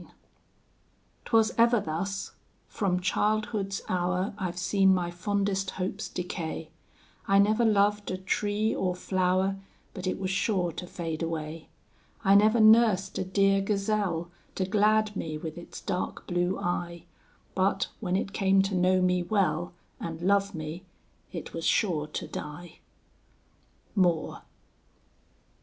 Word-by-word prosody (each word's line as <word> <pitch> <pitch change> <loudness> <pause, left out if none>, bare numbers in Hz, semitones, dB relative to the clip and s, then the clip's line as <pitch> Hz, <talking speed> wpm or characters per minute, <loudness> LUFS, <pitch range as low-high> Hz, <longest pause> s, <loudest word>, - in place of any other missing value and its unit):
IX - - -16 1.1
'Twas 225 -2 +3
ever 235 0 +5
thus; 195 +4 -3 0.4
from 180 -3 0
childhood's 205 0 0
hour 185 +2 0
I've 185 -4 -4
seen 190 +1 +3
my 175 -1 -2
fondest 195 +1 -1
hopes 190 +2 -3
decay; 165 -3 -5 0.6
I 195 - +4
never 215 +4 +4
loved 205 -1 +2
a 185 - -2
tree 205 +3 0
or 180 -1 -1
flower, 185 +1 +1 0.4
But 185 -1 -5
it - - -1
was 190 -1 -2
sure 190 -3 0
to 180 +3 -7
fade 165 -2 -5
away; 160 -1 -4 0.5
I 195 - +5
never 215 +3 +5
nursed 215 -3 +5
a - - 0
dear 195 +1 +2
Gazelle, 195 -4 -1 0.2
To 185 - 0
glad 215 +2 +2
me 155 -4 -3
with 155 0 -6
its 175 - -9
dark 185 -3 -3
blue 175 +1 0
eye, 175 -1 -3 0.5
But, 195 0 +1
when 185 -4 -1
it 195 +1 -2
came 195 0 +3
to 195 0 -2
know 185 +1 +3
me 180 0 +2
well, 175 -3 0 0.3
And 165 -1 -5
love 200 +1 +2
me, 155 +3 -6 0.5
it 170 - -7
was 165 - -5
sure 160 -8 +1
to 150 - -5
die. 160 +3 -8 1.1
MOORE. 175 -5 +1
190 Hz, 135 wpm, -28 LUFS, 175-200 Hz, 1.1 s, ever